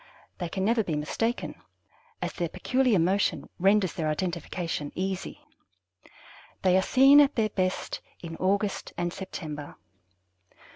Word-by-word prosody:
They 175 -2 -3
can 190 +2 -2
never 225 +1 +3
be 165 -6 -2
mistaken, 225 +11 -2 0.6
as - - -3
their 170 -2 -2
peculiar 255 +3 +2
motion 185 +4 +1
renders 195 0 +3
their 160 -3 -2
identification 170 -2 -3
easy. 190 0 -3 1.2
They 185 -1 +4
are 190 - +5
seen 270 +7 +7
at 285 0 +3
their 220 -2 +2
best 185 -2 -2 0.2
in 165 -1 -7
August 200 +2 0
and 175 0 -1
September. 155 -6 -7
185 Hz, 130 wpm, -27 LUFS, 170-210 Hz, 1.2 s, seen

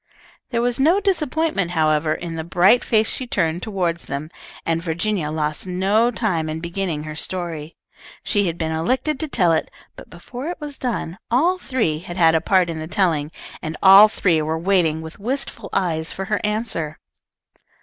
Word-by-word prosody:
There 235 -2 0
was 245 +1 0
no 330 +8 +4
disappointment, 315 - 0
however, 155 -2 +1
in 170 -1 -6
the 160 -1 -4
bright 185 +8 +4
face 220 -1 +2
she 255 - -2
turned 170 -6 0
toward 185 -6 -1
them, 150 +1 -6 0.3
and 165 0 0
Virginia 170 0 -1
lost 155 +2 -3
no 195 +6 +2
time 185 -9 -1
in 155 +1 -3
beginning 170 -2 -3
her 155 0 -7
story. 165 -2 -5 0.5
She 205 -3 +1
had 170 0 -3
been 160 -1 -2
elected 255 - 0
to 315 - -2
tell 180 - +2
it, 160 - 0 0.3
but - - -12
before 245 - -8
it 350 - -4
was 295 -2 -7
done 220 -7 -3
all 335 +10 +2
three 225 - -1
had 175 +1 -8
had 165 -2 +5
a 160 - +2
part 185 -3 +3
in 165 -1 -4
the 155 - -5
telling, 160 -4 +1 0.3
and 155 0 -5
all 195 +2 +10
three 175 -6 +1
were 160 +1 -1
waiting 165 -3 +1
with 160 +3 -10
wistful 235 -2 -4
eyes 165 -4 -1
for 195 - -5
her 210 +1 -1
answer. 210 -8 -2
180 Hz, 180 wpm, -21 LUFS, 160-225 Hz, 0.5 s, all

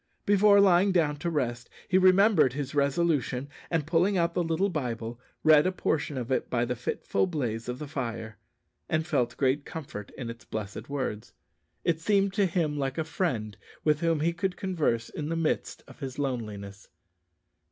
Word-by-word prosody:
Before 205 0 +6
lying 195 0 +5
down 155 -5 +2
to 170 +4 -2
rest 125 -6 -2 0.2
he 185 - +4
remembered 185 - +5
his 140 0 -4
resolution, 140 -2 +1 0.2
and 165 -4 0
pulling 180 +5 +2
out 170 -1 +1
the 175 - +1
little 165 +4 +1
Bible, 120 - -4 0.2
read 155 +1 +6
a - - +1
portion 155 -5 -1
of 125 0 -4
it 130 - 0
by 120 -1 +1
the 125 +1 -2
fitful 120 +9 -1
blaze 120 -9 -3
of 125 - -3
the 150 - -6
fire, 115 -6 -5 0.5
and 160 0 +1
felt 140 -8 0
great 140 +1 +1
comfort 135 -12 -7
in 130 -3 -5
its 115 - -12
blessed 105 +2 -6
words. 125 -5 -4 0.5
It 165 -2 +1
seemed 200 +1 +2
to 200 -1 +3
him 160 -4 -1
like 135 0 -2
a 160 - +1
friend 125 - -2 0.3
with 150 -1 +3
whom 165 -2 +1
he 170 +2 +1
could 180 +1 -2
converse 155 - 0
in 150 0 -5
the 165 - -1
midst 165 -1 -1
of - - -15
his 135 -3 -6
loneliness. 105 -7 -4
150 Hz, 180 wpm, -28 LUFS, 125-175 Hz, 0.5 s, Before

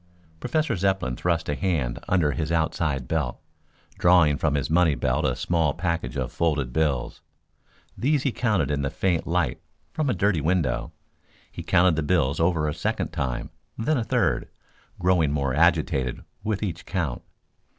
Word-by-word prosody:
Professor 155 - 0
Zepplin 95 -8 0
thrust 85 +4 -1
a 75 - 0
hand 75 -8 -1
under 85 -6 +3
his 80 +1 -3
outside 80 -5 0
belt, 75 -6 -1 0.6
drawing 85 -5 +5
from 75 +1 0
his 70 - 0
money 80 -2 +3
belt - - 0
a 65 - +1
small 80 +3 0
package 85 -2 -2
of - - -2
folded 75 -7 0
bills. 70 -5 -1 0.7
These 140 +6 +1
he 135 - +1
counted 105 - 0
in 70 -1 0
the 70 - -1
faint 85 0 -1
light 85 -2 0 0.3
from 155 -3 0
a 125 - +1
dirty 95 -3 +1
window. 70 -7 0 0.6
He - - -7
counted 90 -1 +3
the - - +1
bills 75 -3 +1
over 80 -2 +2
a 75 - -1
second - - -2
time, 65 -2 -3 0.3
then 150 +7 +1
a - - -1
third, - - 0 0.5
growing 90 -5 +2
more 70 -3 0
agitated 75 -5 +1 0.2
with 105 -1 -2
each 90 -5 -4
count. 80 -10 -2
80 Hz, 160 wpm, -25 LUFS, 70-90 Hz, 0.7 s, drawing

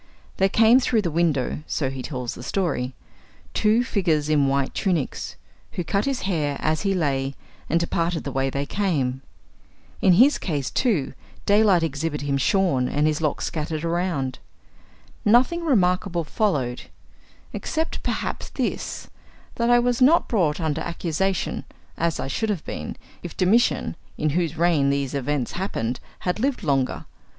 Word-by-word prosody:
There 195 0 +3
came 225 +5 +6
through 230 -4 +1
the 170 - -1
windows 155 -6 +1
(so 135 -3 -1
he 135 -1 -5
tells 125 -3 -4
the - - -9
story) 130 -5 -1 0.6
two 220 +3 +3
figures 165 - 0
in 145 -3 +3
white 135 -1 0
tunics, 175 -9 -1 0.4
who 180 - -2
cut 200 +4 0
his 275 -2 -1
hair 150 -7 0
as 155 0 0
he 195 -1 +1
lay, 135 -5 0 0.3
and 165 - +3
departed 170 0 -1
the 140 - -4
way 135 0 0
they 140 +1 -2
came. 140 -10 -1 0.8
In 185 - +6
his 255 +11 +5
case, 145 -7 -2
too, 195 - +1 0.3
daylight 205 -4 +4
exhibited 150 -1 -2
him 140 -1 +1
shorn, 135 -6 +2
and 145 +1 +1
his 155 0 +1
locks 150 -2 0
scattered 155 0 -3
around. 170 -6 -1 0.8
Nothing 250 +11 +4
remarkable 180 - +2
followed, 145 - -1 0.7
except, 320 +1 -2
perhaps, - - -3
this, - - -3 0.5
that 235 -1 0
I 240 - +6
was 245 +1 +1
not 305 +7 +5
brought 170 -9 +1
under 160 -2 -1
accusation, 170 +3 -1 0.3
as 165 -1 -1
I - - -2
should 220 +11 -2
have 195 -7 -2
been, 75 - -5 0.3
if 175 - -8
Domitian 210 +3 +2 0.2
(in 155 0 0
whose 165 0 -1
reign 165 -5 +3
these 140 -1 -1
events 140 -2 -1
happened) 125 - -2 0.2
had 180 +3 -1
lived 260 -2 0
longer. 135 -5 0
165 Hz, 155 wpm, -24 LUFS, 140-200 Hz, 0.8 s, came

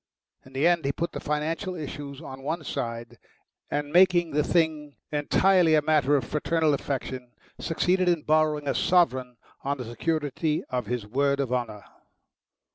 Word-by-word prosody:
In 130 - -17
the 135 +4 +1
end 170 -2 +3
he 140 - +1
put 170 +4 -3
the - - -5
financial 160 +5 -2
issues 145 -2 -7
on 135 -2 -9
one 155 +4 -3
side, 115 -4 -5 0.5
and, 145 0 -3
making 175 -2 +5
the 150 +1 +1
thing 155 -4 0 0.2
entirely 165 +3 +3
a 155 - +4
matter 150 -2 +3
of 135 - +1
fraternal 155 0 +1
affection, 130 -3 -4 0.3
succeeded 180 +2 +1
in 170 -4 +1
borrowing 155 -1 +2
a 135 - +1
sovereign 130 -9 +2 0.3
on 140 +1 -1
the 125 - -6
security 150 +5 -1
of 125 -4 -2
his 120 -2 -3
word 140 +5 +1
of 130 -3 -1
honour. 110 -5 -3
150 Hz, 160 wpm, -26 LUFS, 135-165 Hz, 0.5 s, making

